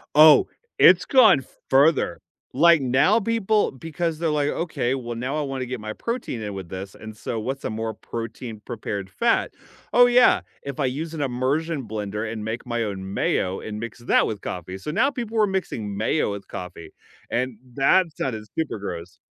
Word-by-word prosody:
Oh, 155 0 +8 0.3
it's - - +7
gone 215 - +6 0.3
further, 145 +4 +3 0.3
like, 165 +3 +6
now, 135 - +3
people 220 -1 +1
because, 160 +3 -3
they're 165 -2 0
like, 150 -1 +1
"Okay, 145 -8 -1
well, 120 -3 -4
now 125 +5 -3
I 155 - 0
wanna 135 -2 -3
get 125 -1 -5
my 110 0 -5
protein 230 - -4
in 105 -1 -4
with 95 -3 -7
this, 95 +1 -7
and 110 -1 -10
so 115 - -4
what's 135 +5 -4
a - - -1
more 110 0 -3
protein-prepared 110 -4 -6
fat? 235 - +1 0.4
Oh 245 0 +7
yeah, 245 0 +5 0.2
if 140 0 -7
I 135 - +2
use 155 +6 -3
an 155 - -3
immersion 135 +2 -1
blender 105 0 -4
and 110 -2 -5
make 115 +2 -4
my 120 -1 -1
own 95 -2 -5
mayo 95 -1 0
and 105 -1 -6
mix 115 0 -7
that 120 - +3
with 105 -2 -4
coffee." 90 +1 -5
So 95 +10 -5
now 270 - +3
people 230 -5 -2
are 210 - +4
mixing 115 - -3
mayo 110 +2 +1
with 100 -1 -7
coffee, 90 -2 -8 0.4
and 125 0 -1 0.2
that 165 +4 +3
sounded 110 -5 -3
super 160 -7 -2
gross. 90 -3 -7
130 Hz, 185 wpm, -24 LUFS, 110-160 Hz, 0.4 s, Oh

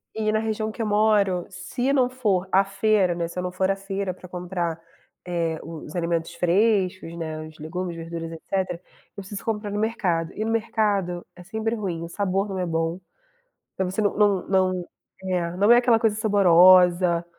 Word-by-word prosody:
e 215 -1 0
na 215 - +1
região 220 0 -2
que 230 - -7
eu - - 0
moro 205 -4 +2
se 220 +9 -2
não 255 -3 +3
for 210 -8 0
à 195 +1 +5
feira, 195 -2 +2
né, 170 -1 -2
se 175 +2 -6
não 180 0 -3
for 185 +1 0
à 195 - +2
feira 195 -1 -4
pra 180 - -13
comprar, 175 -2 -4 0.4
eh, 170 -3 -2
os 160 0 -9
alimentos 170 -1 -1
frescos, 185 -2 +1
né, 155 -1 -5
os 155 0 -15
legumes, 170 +3 -4
verduras, 165 0 -6
etcétera, 180 +1 -3 0.3
eu 200 - -6
preciso 195 +1 -8
comprar 210 -2 -2
no 205 - -2
mercado. 185 -7 -1
E 215 - -3
no 225 - -1
mercado 205 -6 0
é 180 - -12
sempre 220 +4 -2
ruim, 180 -6 -4
o 170 - -7
sabor 195 +1 -1
não 195 -2 -5
é 180 - 0
bom, 165 +1 -1 0.8
você 190 +2 -1
não 205 - +1 0.3
não 185 -2 +1 0.7
não 205 +4 +4
é, - - +7
aquela 240 -2 +4
coisa 220 -2 +2
saborosa, 180 -4 +5
185 Hz, 180 wpm, -24 LUFS, 175-210 Hz, 0.8 s, é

